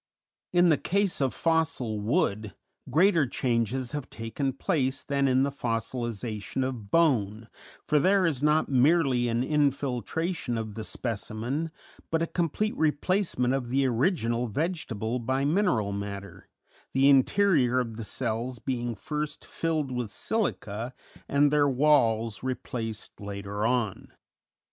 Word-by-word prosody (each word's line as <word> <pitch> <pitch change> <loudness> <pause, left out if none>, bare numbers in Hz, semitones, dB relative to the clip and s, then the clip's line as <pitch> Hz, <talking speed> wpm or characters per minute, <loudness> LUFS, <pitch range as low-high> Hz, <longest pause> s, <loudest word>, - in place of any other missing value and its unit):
In 175 0 +5
the 155 - +3
case 200 -3 0
of 135 -2 +2
fossil 160 -9 0
wood 110 - 0 0.3
greater 165 -3 +4
changes 120 0 -1
have 145 -3 -5
taken 115 +4 -3
place 135 -1 -1
than 140 -1 +1
in 130 0 +3
the 140 - 0
fossilization 115 -1 -3
of 115 -6 -6
bone, 115 -9 +2 0.4
for 150 - +3
there 190 +4 +4
is 145 -6 0
not 150 +1 +3
merely 135 -2 +3
an 115 +1 0
infiltration 140 +1 -1
of 110 -2 -4
the 110 +1 -5
specimen 115 +8 -3 0.4
but 165 0 +1
a - - +2
complete 175 +6 -1
replacement 155 -4 +1
of 130 -3 -2
the 135 +2 +2
original 120 - +1
vegetable 120 - -2
by 130 +3 0
mineral 145 - +2
matter, 100 0 -6 0.4
the 135 +1 +4
interior 135 -2 +4
of 115 -3 -3
the 115 - -6
cells 120 +2 -3
being 120 0 -3
first 150 +7 -4
filled 155 -5 -2
with 125 -3 -3
silica 125 - -2 0.3
and 140 0 +4
their 145 -1 +4
walls 115 -6 +2
replaced 115 -4 -5
later 100 +1 -3
on. 120 -6 -1
130 Hz, 130 wpm, -27 LUFS, 115-150 Hz, 0.4 s, In